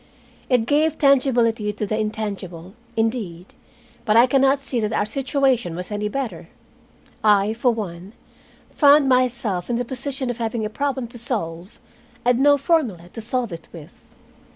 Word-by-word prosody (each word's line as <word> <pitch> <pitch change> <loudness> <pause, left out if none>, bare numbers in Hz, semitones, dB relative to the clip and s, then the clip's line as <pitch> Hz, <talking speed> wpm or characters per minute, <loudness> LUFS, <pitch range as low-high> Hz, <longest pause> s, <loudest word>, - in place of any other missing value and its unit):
It 245 -4 +3
gave 305 +4 +2
tangibility 240 -6 +3
to 210 +1 -4
the 215 - -2
intangible, 200 -5 -4 0.2
indeed, 220 -6 -2 0.5
but 215 -1 +3
I 235 - +8
can 265 +1 +2
not 275 +1 +3
see 255 -3 -2
that 215 -1 -1
our - - +1
situation 260 - 0
was 180 +4 -7
any 210 0 -2
better. 210 -10 -5 0.7
I, 210 0 +4
for 240 +2 +2
one, 195 -3 -6 0.6
found 290 -1 +5
myself 240 -8 +1
in 240 - 0
the 245 +1 -1
position 260 +1 -3
of 240 - -8
having 225 -1 -2
a 210 - -4
problem 270 0 -2
to 240 - -10
solve, 185 -6 -5 0.5
and 245 0 +3
no 285 +1 +5
formula 265 - 0
to 225 - -6
solve 235 -2 -2
it 165 -1 -9
with. 165 0 -14
230 Hz, 160 wpm, -22 LUFS, 205-260 Hz, 0.7 s, I